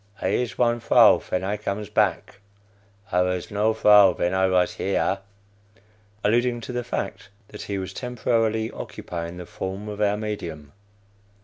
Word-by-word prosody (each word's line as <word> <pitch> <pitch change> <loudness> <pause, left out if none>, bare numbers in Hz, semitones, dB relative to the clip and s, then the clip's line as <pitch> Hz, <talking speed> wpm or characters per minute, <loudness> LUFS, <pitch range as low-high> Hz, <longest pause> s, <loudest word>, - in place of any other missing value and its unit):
I 95 - -1
is 120 +4 -1
one 120 -1 +2
vrow - - +6
ven 90 - -3
I 100 +2 -1
comes 105 0 -4
back; 100 -2 0 0.7
I 90 - +3
vas 90 +1 -2
no 105 +2 +2
vrow 105 -4 +6
ven 90 +1 0
I 95 0 +3
vas 90 -1 +2
here 95 0 0 1.0
(alluding 120 +2 +2
to 120 - -7
the 120 0 -2
fact 100 -4 -5 0.2
that 105 - -9
he 100 - -4
was 95 -1 -5
temporarily 115 -2 -1
occupying 85 0 -7
the 90 - -7
form 95 +4 -6
of 105 0 -6
our 105 0 +2
medium.) 85 -9 -6
105 Hz, 155 wpm, -24 LUFS, 95-110 Hz, 1.0 s, vrow